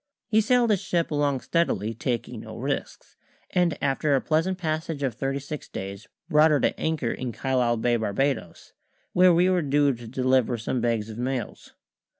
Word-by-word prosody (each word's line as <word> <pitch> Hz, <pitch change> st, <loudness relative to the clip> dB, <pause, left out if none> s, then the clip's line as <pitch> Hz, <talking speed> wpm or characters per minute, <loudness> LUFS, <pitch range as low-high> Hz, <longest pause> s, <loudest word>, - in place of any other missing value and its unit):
He 220 Hz, 0 st, +4 dB
sailed 245 Hz, 0 st, +3 dB
his 200 Hz, -, +2 dB
ship 170 Hz, -2 st, -1 dB
along 145 Hz, -3 st, +1 dB
steadily, 140 Hz, -, 0 dB
taking 120 Hz, +1 st, -3 dB
no -, -, -9 dB
risks, -, -, -4 dB, 0.3 s
and 175 Hz, -4 st, +1 dB
after 140 Hz, +1 st, +2 dB
a -, -, +3 dB
pleasant 165 Hz, +6 st, 0 dB
passage 155 Hz, -3 st, -3 dB
of 130 Hz, -3 st, 0 dB
thirty 135 Hz, +4 st, -2 dB
six 145 Hz, +2 st, -7 dB
days 100 Hz, +4 st, -7 dB, 0.2 s
brought 155 Hz, -1 st, +5 dB
her 150 Hz, -2 st, +3 dB
to -, -, 0 dB
anchor 160 Hz, -7 st, -1 dB
in 130 Hz, -2 st, -4 dB
Carlisle 125 Hz, -1 st, 0 dB
Bay, 120 Hz, +1 st, +1 dB
Barbadoes, 110 Hz, -3 st, -2 dB, 0.4 s
where 180 Hz, 0 st, +6 dB
we 175 Hz, +2 st, +4 dB
were 185 Hz, -1 st, +2 dB
due 145 Hz, -1 st, +2 dB
to 120 Hz, -1 st, -10 dB
deliver 130 Hz, 0 st, +1 dB
some 115 Hz, +3 st, -2 dB
bags 115 Hz, -2 st, -1 dB
of 110 Hz, -, -8 dB
mails. 125 Hz, -1 st, -4 dB
135 Hz, 175 wpm, -25 LUFS, 120-160 Hz, 0.4 s, where